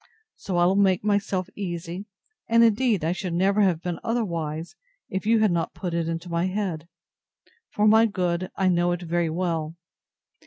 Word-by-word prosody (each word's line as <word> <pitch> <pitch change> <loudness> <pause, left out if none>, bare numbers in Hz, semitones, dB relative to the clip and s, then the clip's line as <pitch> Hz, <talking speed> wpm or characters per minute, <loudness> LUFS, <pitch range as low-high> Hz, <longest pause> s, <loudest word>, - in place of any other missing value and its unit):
So 185 -3 -4
I 175 - +4
will 190 +2 +3
make 190 -2 +3
myself 200 -3 0
easy; 175 0 -5 0.4
and, 230 0 +5
indeed, 225 -5 +2
I 165 - +1
should 180 -1 -3
never 195 +4 +2
have 180 -5 +2
been 175 -2 -3
otherwise, 170 -8 -3 0.3
if 190 +2 -3
you 225 0 +4
had 215 -3 +3
not 170 -1 -1
put 180 -3 -4
it 165 -1 -1
into 165 +2 -4
my 170 +1 0
head; 185 -5 -3 0.8
for 210 +1 +1
my 220 +1 +6
good, 180 -3 -1
I 190 - +1
know 175 -1 +2
very 175 -1 -1
well. 165 -2 -2
180 Hz, 170 wpm, -25 LUFS, 170-200 Hz, 0.8 s, my